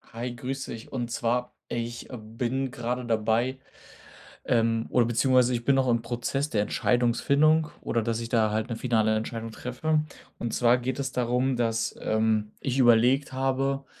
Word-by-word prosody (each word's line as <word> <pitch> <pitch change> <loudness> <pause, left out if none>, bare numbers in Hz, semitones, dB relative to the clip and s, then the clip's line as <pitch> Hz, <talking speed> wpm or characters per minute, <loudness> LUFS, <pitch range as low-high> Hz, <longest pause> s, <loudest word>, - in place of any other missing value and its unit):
Hi, 120 +1 -4
grüß 135 +2 -4
dich. 115 -1 -9
Und 120 -3 -3
zwar, 125 +1 -1
ich 120 0 -4
bin 120 +4 -3
grade 125 +1 -3
dabei, 115 +3 +1 0.9
ähm, 115 -1 +1
oder 120 -2 +3
beziehungsweise, 125 +1 +3
ich 120 -1 -2
bin 135 +2 +3
auch 130 -1 +2
im 120 -1 +2
Prozess 125 +5 -2
der 105 -5 +1
Entscheidungsfindung 140 +8 +2
oder 115 - 0
dass 115 0 -1
ich 115 - -4
da 110 -3 +3
halt 110 +1 -1
'ne 115 - -2
finale 110 -2 +1
Entscheidung 115 +1 -4
treffe. 150 +7 -1 0.4
Und 120 -1 -3
zwar 120 0 +4
geht 125 +1 -3
es 135 -2 -3
darum, 125 +1 0
ähm, 130 - 0
dass 115 -2 0 0.6
ich 135 -1 -2
überlegt 125 +3 +4
habe, 135 +1 0
120 Hz, 165 wpm, -27 LUFS, 115-130 Hz, 0.9 s, zwar